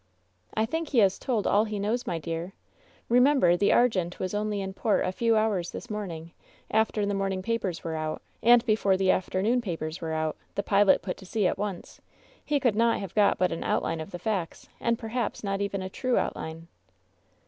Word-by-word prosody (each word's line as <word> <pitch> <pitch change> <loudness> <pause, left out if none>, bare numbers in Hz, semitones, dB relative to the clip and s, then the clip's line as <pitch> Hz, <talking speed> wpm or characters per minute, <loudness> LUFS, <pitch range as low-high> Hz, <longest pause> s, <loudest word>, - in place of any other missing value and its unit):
'' 90 0 -43
"I 220 - +2
think 325 +7 -3
he 265 - -1
has 195 -4 +4
told 235 -6 -1
all 210 +2 +3
he 215 -1 -4
knows, 215 +5 -1
my 170 - -1
dearl 165 +3 -5 0.5
Remem 260 +4 +4
ber 175 -4 +5
the 200 +3 +2
Argents 185 -8 +2
was 185 0 -3
only 210 0 -1
in 190 -1 -4
port 210 +2 +1
a - - 0
few 230 +4 +1
hours 205 -5 +1
this 245 - -8
morn 210 -2 -3
ing, 165 0 -8 0.4
after 220 -1 +2
the 200 - -1
morning 195 -1 -1
papers 210 -6 -2
were 165 - -3
out, 155 0 -3 0.2
and 240 +1 +6
before 210 -4 +2
the 190 -1 +3
afternoon 205 +6 +1
papers 165 -6 -4
were 160 -1 -3
out. 155 0 -1 0.2
The 200 - -1
pilot 200 -3 +4
put 180 0 -4
to 190 - -13
sea 210 0 0
at - - +1
once. 200 -4 -5 0.4
He 295 -1 +1
could 245 -6 +2
not 230 +1 +3
have 195 -4 -6
got 210 -2 +3
but 180 -1 +1
an 165 - -3
outline 165 - -1
of 160 - -7
the 175 - -6
facts, 190 -4 -3
and 235 0 +1
perhaps 225 0 -3
not 195 -1 -1
even 200 -1 -2
a - - -3
true 255 +5 -1
outline." 165 +1 -3
200 Hz, 215 wpm, -27 LUFS, 180-225 Hz, 0.5 s, and